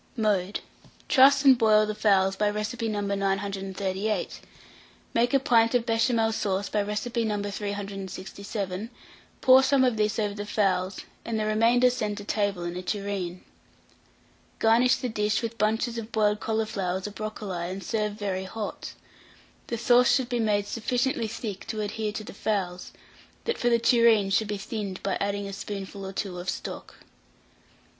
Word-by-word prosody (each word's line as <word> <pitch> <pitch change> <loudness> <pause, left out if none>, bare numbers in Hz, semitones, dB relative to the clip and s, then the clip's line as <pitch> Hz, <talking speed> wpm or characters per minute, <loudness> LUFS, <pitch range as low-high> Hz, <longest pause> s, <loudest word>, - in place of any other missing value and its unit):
Mode. 205 -3 0 0.5
Truss 275 0 +6
and 265 -1 +9
boil 215 -2 +4
the 215 - -2
fowls 195 -2 +3
by 210 +1 +1
recipe 210 +3 -3
No. 210 -1 -1
938; 195 0 -2 0.7
make 240 +1 +2
a 275 - +4
pint 230 -2 +3
of 235 -1 +2
Béchamel 225 -1 +2
sauce 200 -2 -1
by 210 - +1
recipe 220 +3 -2
No. 210 -2 -1
367; 200 0 -5 0.5
pour 260 0 +7
some 265 0 +3
of 250 -3 +2
this 215 0 +1
over 210 -2 0
the 205 0 -6
fowls, 190 -3 0 0.2
and 225 -1 -2
the 215 - 0
remainder 230 +4 +4
send 210 -4 -2
to 205 - -6
table 200 -3 -1
in 175 0 -4
a 180 - -4
tureen. 190 -2 -3 1.1
Garnish 240 +3 +4
the 255 - -3
dish 215 -1 0
with 230 0 -4
bunches 225 +2 0
of 225 0 -8
boiled 210 -1 +2
cauliflowers 200 -4 -2
or - - -7
brocoli, 200 -5 -5
and 190 +1 -6
serve 210 +2 -1
very 195 -3 -3
hot. 210 +2 -6 0.7
The 235 - -3
sauce 245 +2 +5
should 260 -3 -1
be 245 -1 -1
made 210 -2 +1
sufficiently 245 +2 -1
thick 210 -2 -6
to 215 - -4
adhere 210 +1 -2
to 215 - -5
the - - -9
fowls; 190 -4 -2 0.5
that 465 - -2
for 240 - +2
the 235 - +4
tureen 230 -4 +4
should 215 +2 +2
be 205 0 -2
thinned 200 -2 -5
by 195 - 0
adding 200 0 -1
a 195 - -6
spoonful 195 0 -6
or - - -5
two 190 -2 -4
of 175 - -4
stock. - - -6
210 Hz, 165 wpm, -27 LUFS, 195-230 Hz, 1.1 s, and